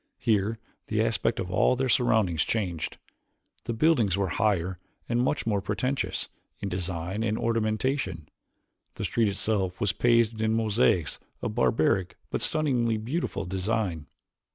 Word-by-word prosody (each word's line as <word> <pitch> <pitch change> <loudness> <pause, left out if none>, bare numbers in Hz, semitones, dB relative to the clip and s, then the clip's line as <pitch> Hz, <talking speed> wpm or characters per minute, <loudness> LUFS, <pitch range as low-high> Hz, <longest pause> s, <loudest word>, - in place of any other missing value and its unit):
Here 110 0 +1 0.3
the 110 - -1
aspect 115 0 0
of 90 - -3
all 100 +6 +3
their 130 +1 0
surroundings 110 - +3
changed. 90 -8 -2 0.7
The 115 - -2
buildings 115 - +3
were 100 -2 0
higher 95 -2 0 0.3
and 120 0 +1
much 130 +4 0
more 105 -3 +1
pretentious 125 +7 -1 0.3
in 100 - -3
design 90 +2 -3
and 110 -1 0
ornamentation. 110 - -1 0.7
The - - -4
street 115 -2 +2
itself 100 -2 -1
was 100 - +2
paved 115 +3 +2
in 110 0 +2
mosaics 105 - +2 0.2
of - - -2
barbaric 95 -5 +1
but - - -1
stunningly 125 -8 +1
beautiful 120 - -2
design. 95 -4 -2
110 Hz, 135 wpm, -27 LUFS, 95-115 Hz, 0.7 s, all